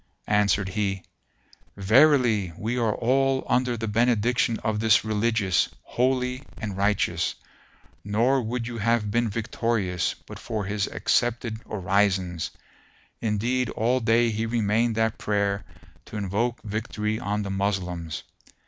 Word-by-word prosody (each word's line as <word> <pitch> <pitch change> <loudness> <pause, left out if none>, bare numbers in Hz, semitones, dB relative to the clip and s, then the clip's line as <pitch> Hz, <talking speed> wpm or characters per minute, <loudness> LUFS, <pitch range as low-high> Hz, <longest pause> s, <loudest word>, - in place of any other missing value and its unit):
Answered 100 -1 +2
he, 95 -1 -2 0.7
"Verily 110 - +4
we 115 +3 -2
are 115 -4 +1
all 135 +2 +1
under 125 -1 +1
the 115 0 -3
benediction 115 +1 +2
of 110 -1 0
this 110 -1 +4
Religious, 110 -3 +1
holy 125 +1 0 0.2
and 105 -4 -4
righteous, 100 +1 +1 0.7
nor 115 +7 +2
would 120 +1 -3
you 120 -1 -5
have 110 -1 +1
been 120 +1 +1
victorious, 105 -4 -1
but - - -10
for 110 -4 -3
his 100 0 -1
accepted 120 -2 0
orisons; 95 -3 0 0.7
indeed 115 +3 0
all 120 +4 +1
day 115 0 +3
he 110 +1 -2
remained 115 0 +1
at 110 -1 0
prayer 100 -1 0 0.4
to 110 - -7
invoke 105 +5 -1
victory 105 0 -3
on 105 -3 -2
the 100 - -4
Moslems." 90 -5 -2
110 Hz, 125 wpm, -25 LUFS, 100-120 Hz, 0.7 s, Verily